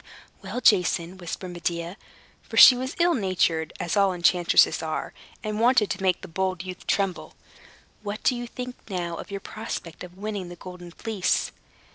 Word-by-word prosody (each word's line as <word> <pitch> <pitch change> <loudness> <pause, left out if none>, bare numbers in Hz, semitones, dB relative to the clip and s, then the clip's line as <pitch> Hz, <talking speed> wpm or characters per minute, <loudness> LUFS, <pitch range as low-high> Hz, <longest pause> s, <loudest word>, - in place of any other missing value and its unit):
"Well, 200 +6 -5
Jason," 180 -3 +3
whispered 180 +1 -6
Medea 170 0 -3 0.5
(for - - -8
she 255 - +11
was 260 +2 -4
ill 345 0 +3
natured, 180 - 0
as 170 - -2
all 200 -2 +3
enchantresses 175 0 +4
are, 160 -1 -4 0.3
and 215 0 -3
wanted 235 -3 +4
to 190 - -3
make 185 -1 +1
the 190 - -8
bold 185 0 -2
youth 185 -1 -9
tremble), 195 -3 -1 0.7
"what 210 +1 -5
do - - +4
you 240 0 -5
think 250 +1 -7
now 175 -3 -3
of - - -8
your 200 -1 -5
prospect 190 -7 -7
of 180 0 -11
winning 200 -3 -4
the 175 - -9
Golden 180 0 -10
Fleece?" 200 +1 -1
190 Hz, 170 wpm, -25 LUFS, 175-215 Hz, 0.7 s, she